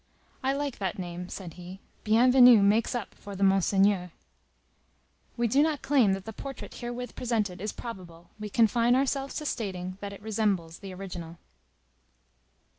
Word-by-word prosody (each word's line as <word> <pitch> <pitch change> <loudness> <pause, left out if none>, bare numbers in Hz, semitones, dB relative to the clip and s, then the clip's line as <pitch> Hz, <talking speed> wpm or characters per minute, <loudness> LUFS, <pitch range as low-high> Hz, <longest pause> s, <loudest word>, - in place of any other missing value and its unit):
"I 265 0 +1
like 280 -2 -3
that 190 -3 -2
name," 180 -1 -6
said 180 -5 -7
he. 180 +2 -10 0.3
"Bienvenu 245 0 +7
makes 215 +5 +2
up 235 -5 -4
for 200 -1 -10
the 195 - -1
Monseigneur." 195 -1 +3 1.3
We 235 0 +2
do 270 +6 +3
not 305 -2 0
claim 260 -9 +4
that 195 0 -5
the 220 - -7
portrait 270 +4 -8
herewith 245 0 -6
presented 210 -7 -1
is 210 0 -2
probable; 175 -7 -9
we 210 0 -5
confine 235 +3 +3
ourselves 275 +1 0
to 305 - -4
stating 185 -7 -4
that 200 0 -5
it 200 0 -11
resembles 200 -6 -1
the 195 -2 -8
original. 180 -3 -7
205 Hz, 155 wpm, -28 LUFS, 185-245 Hz, 1.3 s, Bienvenu